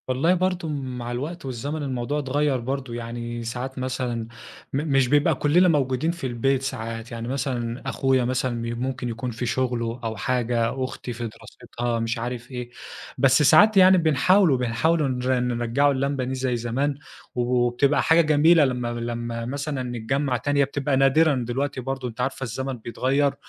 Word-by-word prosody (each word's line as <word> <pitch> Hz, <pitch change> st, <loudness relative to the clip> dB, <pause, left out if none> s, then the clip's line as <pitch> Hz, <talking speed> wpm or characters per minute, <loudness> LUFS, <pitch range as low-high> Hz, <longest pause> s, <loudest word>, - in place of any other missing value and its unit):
والله 130 Hz, +7 st, +2 dB
برضه 180 Hz, -2 st, 0 dB
مع 130 Hz, -4 st, -4 dB
الوقت 145 Hz, +7 st, -5 dB
والزمن، 140 Hz, +4 st, -4 dB
الموضوع 135 Hz, +2 st, -2 dB
اتغيَّر 145 Hz, 0 st, 0 dB
برضه. 130 Hz, 0 st, -4 dB
يعني 120 Hz, 0 st, -5 dB
ساعات 125 Hz, +3 st, -5 dB
مثلًا 125 Hz, -3 st, -3 dB, 0.5 s
م -, -, +1 dB
مش 135 Hz, -3 st, +2 dB
بيبقى 145 Hz, +3 st, +3 dB
كُلّنا 170 Hz, +5 st, +4 dB
موجودين 140 Hz, -1 st, +1 dB
في 170 Hz, -6 st, -5 dB
البيت 130 Hz, +2 st, 0 dB
ساعات، 115 Hz, -2 st, -5 dB
يعني 115 Hz, 0 st, -5 dB
مثلًا 125 Hz, -3 st, -3 dB
أخويا 130 Hz, -2 st, +1 dB
مثلًا 130 Hz, +1 st, 0 dB
م 115 Hz, 0 st, -4 dB
ممكن 130 Hz, -1 st, -3 dB
يكون 115 Hz, +2 st, -4 dB
في 120 Hz, +2 st, -4 dB
شغله 120 Hz, -1 st, -1 dB
أو 110 Hz, -1 st, -3 dB
حاجة، 120 Hz, +2 st, 0 dB
أختي 130 Hz, -1 st, -5 dB
في 120 Hz, 0 st, -4 dB
دراستها، 120 Hz, +2 st, -5 dB
مش 115 Hz, +2 st, -2 dB
عارف 120 Hz, +1 st, -5 dB
إيه. 125 Hz, -1 st, -5 dB, 0.5 s
بس 135 Hz, +2 st, +4 dB
ساعات 205 Hz, -, +6 dB
يعني 185 Hz, 0 st, +7 dB
بنحاولوا 165 Hz, 0 st, +4 dB
بنحاولوا 140 Hz, +6 st, +1 dB
نر 130 Hz, 0 st, 0 dB
نرجِّعوا 125 Hz, +3 st, +1 dB
اللمة 135 Hz, 0 st, -1 dB
دي 130 Hz, +1 st, -3 dB
زي 130 Hz, -1 st, -1 dB
زمان، 130 Hz, +5 st, -1 dB, 0.4 s
وبتبقى 125 Hz, +3 st, +2 dB
حاجة 165 Hz, +1 st, +5 dB
جميلة 155 Hz, +1 st, +5 dB
لمّا 125 Hz, -2 st, -2 dB
لمّا 120 Hz, 0 st, -4 dB
مثلًا 140 Hz, +1 st, -3 dB
نتجمَّع 125 Hz, +2 st, -1 dB
تاني. 145 Hz, +4 st, 0 dB
هي 140 Hz, -, +5 dB
بتبقى 140 Hz, 0 st, -1 dB
نادرًا 135 Hz, 0 st, +3 dB
دلوقتي 130 Hz, +2 st, -2 dB
برضه، 135 Hz, 0 st, -4 dB
أنتِ 120 Hz, +1 st, -6 dB
عارفة، 130 Hz, +1 st, -2 dB
الزمن 130 Hz, +2 st, -4 dB
بيتغيَّر. 135 Hz, +5 st, 0 dB
130 Hz, 165 wpm, -24 LUFS, 120-140 Hz, 0.5 s, يعني